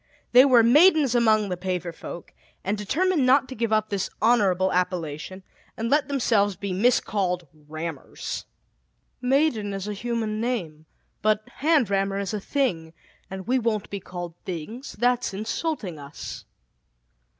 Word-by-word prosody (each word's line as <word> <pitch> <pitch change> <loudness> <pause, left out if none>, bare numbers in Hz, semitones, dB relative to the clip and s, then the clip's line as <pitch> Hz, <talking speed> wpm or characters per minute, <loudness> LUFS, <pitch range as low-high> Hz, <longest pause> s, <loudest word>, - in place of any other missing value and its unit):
They 250 +2 +8
were 250 -4 +6
"maidens" 295 +2 +5
among 220 -4 +3
the 180 - -1
paver 180 -1 -3
folk, 170 +1 -9 0.3
and 200 +3 0
determined 300 - +1
not 260 +1 +4
to 260 - -6
give 230 -1 -1
up 215 0 +2
this 195 -1 -1
honorable 195 -5 +3
appellation, 180 0 -2 0.3
and 230 +1 -2
let 295 +1 +3
themselves 225 -8 +2
be 195 +1 -4
miscalled 190 -4 +1 0.2
"rammers. 155 -1 -6 0.8
"Maiden 250 -6 +1
is 195 +1 -5
a 210 - -2
human 220 0 -2
name, 170 -11 -3 0.3
but 215 0 +1
hand 290 - +2
rammer 195 0 +1
is 200 -1 -3
a 210 - -1
thing, 180 - -1 0.4
and 190 -1 -7
we 255 +1 +2
won't 220 -3 -1
be 200 - -3
called 175 -2 -7
things 195 - -6
that's 245 -3 0
insulting 215 - -3
us." 140 +1 -8
210 Hz, 145 wpm, -25 LUFS, 185-245 Hz, 0.8 s, They